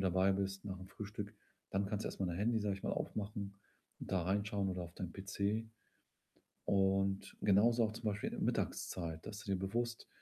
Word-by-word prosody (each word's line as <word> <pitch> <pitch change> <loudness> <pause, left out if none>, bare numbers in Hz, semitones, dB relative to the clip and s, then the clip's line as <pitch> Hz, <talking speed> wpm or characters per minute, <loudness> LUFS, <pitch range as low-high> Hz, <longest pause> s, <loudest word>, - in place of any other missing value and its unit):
dabei 95 +1 +4
bist, 95 0 -1
nach'm 95 -1 -5
Frühstück 105 0 -5 0.4
dann 100 +1 +1
kannst 105 +1 -1
du - - 0
erstmal 95 -2 -1
dein 85 - -1
Handy, 110 +1 +3
sage 100 -1 +1
ich 95 - -12
mal - - 0
aufmachen 100 -1 -3 0.4
und - - -6
da 95 -2 +3
reinschauen, 100 +1 +1
oder 90 -1 -1
auf 85 0 -7
deinen 90 -3 -4
PC 100 +3 -1 1.0
und 95 0 +2
genauso, 115 +4 +6
auch 110 - -1
zum 115 +1 -7
Beispiel 105 -1 0
in - - -5
der - - -3
Mittagszeit, 80 -3 -1
dass 105 -1 -5
du 100 - -2
dir - - +2
bewusst, 115 +5 -1
100 Hz, 195 wpm, -37 LUFS, 95-105 Hz, 1.0 s, genauso